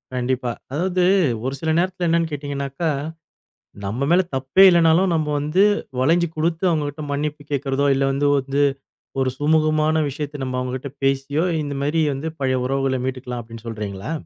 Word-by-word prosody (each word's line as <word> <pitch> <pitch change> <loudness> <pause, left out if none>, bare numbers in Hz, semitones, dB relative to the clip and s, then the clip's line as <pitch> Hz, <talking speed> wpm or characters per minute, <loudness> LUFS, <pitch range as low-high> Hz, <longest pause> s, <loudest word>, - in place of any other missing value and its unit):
கண்டிப்பா. 125 0 -1 0.2
அதாவது 180 +5 0 0.4
ஒரு 135 - -1
சில 160 - -2
நேரத்துல 180 0 0
என்னன்னு 165 0 +2
கேட்டீங்கனாக்கா, 140 +2 -3 1.0
நம்ம 115 +8 -2
மேல 180 +2 +6
தப்பே 135 +8 +4
இல்லனாலும் 170 +1 +4
நம்ம 155 -2 0
வந்து 150 +7 +2 0.4
வளஞ்சு 165 +6 +3
குடுத்து, 165 +2 -1
அவுங்ககிட்ட 150 -2 -2
மன்னிப்பு 150 +1 -2
கேட்குறதோ, 140 0 0
இல்ல 135 - +1
வந்து 140 +1 +1
வந்து 140 +2 0 0.6
ஒரு 130 -1 +2
சுமூகமான 155 +1 +2
விஷயத்த 145 +1 -5
நம்ம 130 -1 -3
அவுங்கட்ட 130 +2 -4
பேசியோ, 135 +3 +1 0.2
இந்த 145 -1 -4
மாரி 155 +3 +1
வந்து 140 +4 -4
பழைய 130 -1 +1
உறவுகள 135 0 0
மீட்டுக்கலாம் 125 -2 -4
அப்டின்னு 115 0 -12
சொல்றீங்களா? 105 +1 -5
145 Hz, 145 wpm, -21 LUFS, 130-160 Hz, 1.0 s, மேல